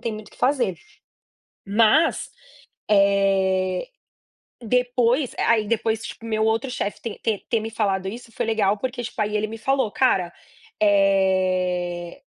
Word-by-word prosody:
tem 230 Hz, -, -3 dB
muito 215 Hz, 0 st, -8 dB
o -, -, -24 dB
que -, -, -20 dB
fazer." 255 Hz, -9 st, +1 dB, 0.9 s
Mas, 225 Hz, +10 st, +3 dB, 2.3 s
eh, -, -, -10 dB
depois 250 Hz, +2 st, +1 dB
aí -, -, +1 dB, 0.2 s
aí, 210 Hz, -, -7 dB
depois, 220 Hz, 0 st, 0 dB
tipo, 230 Hz, -, -8 dB
meu 220 Hz, -1 st, 0 dB
outro 225 Hz, +4 st, 0 dB
chefe 205 Hz, -4 st, -4 dB
te 225 Hz, -3 st, -6 dB
te 215 Hz, -3 st, -2 dB
ter 230 Hz, -, +2 dB
me 225 Hz, -, -4 dB
falado 195 Hz, -3 st, -1 dB
isso 230 Hz, +3 st, -8 dB
foi -, -, -3 dB
legal 210 Hz, -2 st, +1 dB
porque, 250 Hz, +2 st, -4 dB
tipo, 235 Hz, -1 st, -8 dB
aí 210 Hz, 0 st, -1 dB
ele 215 Hz, +1 st, 0 dB
me 225 Hz, +1 st, -7 dB
falou: 265 Hz, 0 st, 0 dB
"Cara, 190 Hz, -9 st, +1 dB, 0.5 s
eh, 185 Hz, -3 st, +1 dB
220 Hz, 150 wpm, -23 LUFS, 195-240 Hz, 2.3 s, Mas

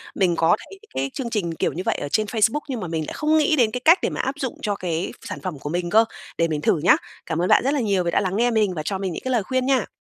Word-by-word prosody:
Mình 180 Hz, -4 st, +2 dB
có 165 Hz, +2 st, +4 dB
thấy 390 Hz, -, -13 dB
cái 135 Hz, +1 st, -1 dB
chương 250 Hz, -3 st, -4 dB
trình 195 Hz, -7 st, -1 dB
kiểu -, -, -1 dB
như 180 Hz, -, -4 dB
vậy -, -, +1 dB
ở 145 Hz, -, -4 dB
trên 215 Hz, +7 st, +1 dB
Facebook 225 Hz, +6 st, +1 dB
nhưng 255 Hz, -4 st, -3 dB
mà 185 Hz, -, -4 dB
mình 160 Hz, -1 st, -2 dB
lại -, -, -5 dB
không 305 Hz, +1 st, +2 dB
nghĩ 310 Hz, +1 st, +3 dB
đến 235 Hz, -6 st, +3 dB
cái 250 Hz, -, -3 dB
cách 335 Hz, +4 st, +7 dB
để -, -, 0 dB
mà -, -, -2 dB
áp 270 Hz, +2 st, -2 dB
dụng 260 Hz, -4 st, -3 dB
cho 205 Hz, -2 st, -1 dB
cái 175 Hz, -3 st, -3 dB
sản -, -, -6 dB
phẩm 180 Hz, -7 st, -5 dB
của 145 Hz, -, -5 dB
mình 175 Hz, +2 st, -2 dB
cơ, 220 Hz, +4 st, +5 dB, 0.3 s
để 165 Hz, -, +2 dB
mình 155 Hz, -2 st, -2 dB
thử 160 Hz, -, +2 dB
nhá. 170 Hz, -, +6 dB, 0.3 s
Cảm 160 Hz, +1 st, -2 dB
ơn 180 Hz, -, +1 dB
bạn -, -, +5 dB
rất 275 Hz, +3 st, +1 dB
là 290 Hz, -, +1 dB
nhiều 200 Hz, -6 st, +1 dB
vì 170 Hz, -, -1 dB
đã -, -, +2 dB
lắng 190 Hz, -1 st, -1 dB
nghe 240 Hz, +3 st, +2 dB
mình 215 Hz, -4 st, +2 dB
và 155 Hz, -, -3 dB
cho 195 Hz, -, -1 dB
mình 190 Hz, -2 st, -3 dB
những -, -, -6 dB
cái 260 Hz, -, -2 dB
lời 235 Hz, -5 st, +2 dB
khuyên 260 Hz, +3 st, -1 dB
nha! 265 Hz, -5 st, +2 dB
200 Hz, 330 wpm, -23 LUFS, 170-250 Hz, 0.3 s, cách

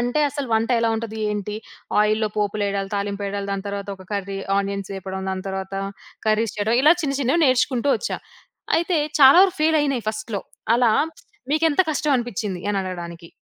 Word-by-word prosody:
అంటే, 245 Hz, +5 st, 0 dB
అసలు 285 Hz, -1 st, -4 dB
వంట 225 Hz, +2 st, +1 dB
ఎలా 230 Hz, 0 st, +2 dB
ఉంటుంది, 220 Hz, -1 st, -5 dB
ఏంటి, 210 Hz, 0 st, -4 dB, 0.5 s
ఆయిల్‌లో 215 Hz, +1 st, +1 dB
పోపులెయడాలు, 200 Hz, -1 st, -1 dB
తాలింపెయడాలు, 200 Hz, 0 st, -3 dB
దాని 195 Hz, 0 st, -4 dB
తర్వాత 200 Hz, 0 st, -5 dB
ఒక 190 Hz, -1 st, -14 dB
కర్రీ, 195 Hz, -1 st, -3 dB, 0.2 s
ఆనియన్సేపడం, 195 Hz, -1 st, -4 dB
దాని 185 Hz, 0 st, -4 dB
తర్వాతా 190 Hz, 0 st, -4 dB, 0.5 s
కర్రీస్ 215 Hz, +1 st, +1 dB
చేయడం, 220 Hz, +3 st, +2 dB
ఇలా 310 Hz, +4 st, +7 dB
చిన్న, 275 Hz, -2 st, -1 dB
చిన్నవి 280 Hz, +6 st, +2 dB
నేర్చుకుంటూ 255 Hz, +1 st, +2 dB
ఒచ్చా. 480 Hz, -, -3 dB, 0.6 s
అయితే 340 Hz, 0 st, +1 dB, 0.2 s
చాలా 270 Hz, +4 st, +9 dB
వరకు 385 Hz, -1 st, +2 dB
ఫెయిలయినయి 290 Hz, -7 st, +2 dB
ఫస్ట్‌లో. 215 Hz, -2 st, -5 dB, 0.3 s
అలా 240 Hz, -2 st, +4 dB, 0.6 s
మీకెంత 310 Hz, +1 st, +3 dB
కష్టవనిపిచ్చింది 240 Hz, -, -1 dB
అనడగడానికి. 175 Hz, -3 st, -5 dB
215 Hz, 145 wpm, -22 LUFS, 195-265 Hz, 0.6 s, చాలా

